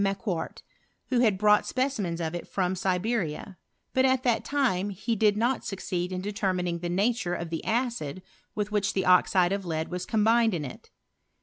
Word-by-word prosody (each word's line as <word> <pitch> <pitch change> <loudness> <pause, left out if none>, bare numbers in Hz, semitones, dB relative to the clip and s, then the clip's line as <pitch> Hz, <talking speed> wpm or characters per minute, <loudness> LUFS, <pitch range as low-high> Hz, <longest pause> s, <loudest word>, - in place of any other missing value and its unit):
Macqcait, 195 -3 -2 0.5
who 250 - +2
had 220 -6 +3
bron^it 210 +1 +4
specimens 250 -10 -1
of 160 -1 -2
it 175 - -5
from 185 -1 -1
Siberia; 185 -2 -2 0.3
but 260 - +3
at 260 -1 +3
that 235 -3 +2
time 235 -10 0
he 215 +4 -2
did 210 -1 +3
not 240 +4 +1
succeed 185 -2 -3
in 185 0 -3
detennining 185 -4 -1
the 175 - -3
nature 200 0 0
of 170 -1 -5
tbe 165 - -2
acid 225 - -2 0.3
with 210 0 -2
which 205 -1 +1
the 190 - 0
oxide 180 0 +4
of 200 0 -1
lead 160 -2 -3
was 180 0 -4
combined 225 -1 +3
in 150 -3 -3
it. 125 - -10
195 Hz, 180 wpm, -27 LUFS, 180-225 Hz, 0.5 s, bron^it